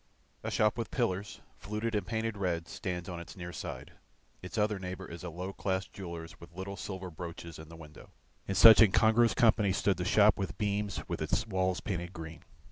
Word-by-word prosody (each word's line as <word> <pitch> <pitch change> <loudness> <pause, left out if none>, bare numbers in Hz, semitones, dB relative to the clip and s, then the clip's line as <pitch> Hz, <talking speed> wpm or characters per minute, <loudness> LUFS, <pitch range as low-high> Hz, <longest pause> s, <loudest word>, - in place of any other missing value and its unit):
A - - -3
shop 105 +2 +2
with 115 - -3
pillars, 105 -5 -2 0.2
fluted 105 +3 -3
and 105 - -1
painted 115 -1 -2
red, 85 -4 -1
stands 90 -2 -4
on 90 -2 -5
its 85 - -10
near 85 -1 -6
side, - - -6 0.5
its 90 +5 -7
other 105 -1 +1
neighbour 95 0 -6
is 85 +1 -9
a 90 - -4
low 90 +4 -5
class 95 -1 -1
jeweller's 85 +1 -8
with 85 0 -14
little 95 +2 -5
silver 95 -2 -6
brooches 85 0 -8
in 80 0 -11
the 80 - -11
window. 75 -2 -13 0.4
In 95 - -2
such 110 +4 +10
incongruous 110 +2 +5
company 110 -4 +4
stood 95 0 +1
the 90 - -2
shop 105 +3 +5
with 95 - -3
beams 105 -1 -2
with - - -4
its 110 - 0
walls 95 -3 0
painted 85 -2 -4
green. 80 -2 -8
95 Hz, 200 wpm, -31 LUFS, 85-105 Hz, 0.5 s, such